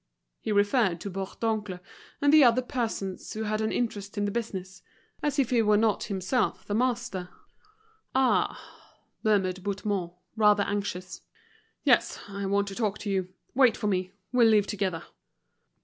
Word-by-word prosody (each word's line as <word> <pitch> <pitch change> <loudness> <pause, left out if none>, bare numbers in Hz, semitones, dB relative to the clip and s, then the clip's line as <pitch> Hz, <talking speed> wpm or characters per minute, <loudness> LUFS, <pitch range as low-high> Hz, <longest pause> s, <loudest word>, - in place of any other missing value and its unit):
He - - -3
referred 205 -3 +2
to 200 - -5
Bourdoncle 195 0 -3 0.4
and 285 +1 +4
the 310 -2 +8
other 245 +1 +5
persons 220 -7 -3
who 220 - -3
had 215 0 -1
an 220 - 0
interest 205 -4 -3
in 205 - +1
the 205 - -1
business, 190 -5 -5 0.4
as 295 -1 -1
if 265 -4 +1
he 240 -2 +4
were 210 -1 +4
not 220 -1 +2
himself 200 +5 -1
the 205 - -3
master. 235 -6 -1 0.9
"Ah!" 260 -2 +2 0.6
murmured 190 -4 +1
Bouthemont, 200 -2 -2 0.2
rather 210 -2 +4
anxious. 200 -3 -4 0.6
"Yes, - - +3
I 200 -1 -4
want 200 +1 +1
to 195 - -7
talk 210 -3 -1
to 205 - -4
you. 185 -1 -1 0.2
Wait 255 -4 +4
for - - -4
me, 185 -2 0 0.2
we'll 240 -2 +5
leave 210 -2 +4
together." 195 -5 -2
205 Hz, 155 wpm, -28 LUFS, 195-230 Hz, 0.9 s, the